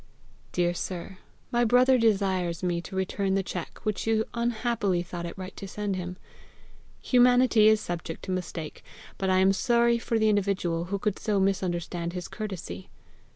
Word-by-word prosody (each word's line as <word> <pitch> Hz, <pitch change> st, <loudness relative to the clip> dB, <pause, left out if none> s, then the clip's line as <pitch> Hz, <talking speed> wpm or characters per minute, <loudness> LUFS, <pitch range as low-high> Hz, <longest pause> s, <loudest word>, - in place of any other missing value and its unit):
"Dear 175 Hz, -1 st, +1 dB
sir, 185 Hz, +1 st, -5 dB, 0.3 s
My 240 Hz, 0 st, +3 dB
brother 250 Hz, +2 st, +5 dB
desires 190 Hz, -6 st, +1 dB
me 175 Hz, -1 st, 0 dB
to 190 Hz, -, -9 dB
return 190 Hz, +1 st, 0 dB
the 195 Hz, -, +1 dB
cheque 180 Hz, -2 st, -6 dB
which 215 Hz, 0 st, -2 dB
you 220 Hz, 0 st, +2 dB
unhappily 235 Hz, -6 st, 0 dB
thought 175 Hz, -1 st, -6 dB
it 170 Hz, -, -8 dB
right 185 Hz, 0 st, -7 dB
to 195 Hz, -, -6 dB
send 205 Hz, 0 st, -3 dB
him. 180 Hz, 0 st, -5 dB, 0.9 s
Humanity 245 Hz, -3 st, +5 dB
is 215 Hz, -1 st, +5 dB
subject 170 Hz, -2 st, -5 dB
to 190 Hz, -, -4 dB
mistake, 175 Hz, -4 st, -5 dB, 0.4 s
but 190 Hz, -, 0 dB
I 185 Hz, -, +4 dB
am 190 Hz, +1 st, +5 dB
sorry 235 Hz, +1 st, +3 dB
for 230 Hz, 0 st, -1 dB
the 220 Hz, 0 st, +3 dB
individual 190 Hz, -5 st, 0 dB
who 200 Hz, +3 st, -2 dB
could 200 Hz, 0 st, -2 dB
so 210 Hz, -2 st, 0 dB
misunderstand 175 Hz, -3 st, -1 dB
his 180 Hz, -1 st, -5 dB
courtesy. 185 Hz, -, -6 dB
195 Hz, 165 wpm, -27 LUFS, 180-220 Hz, 0.9 s, brother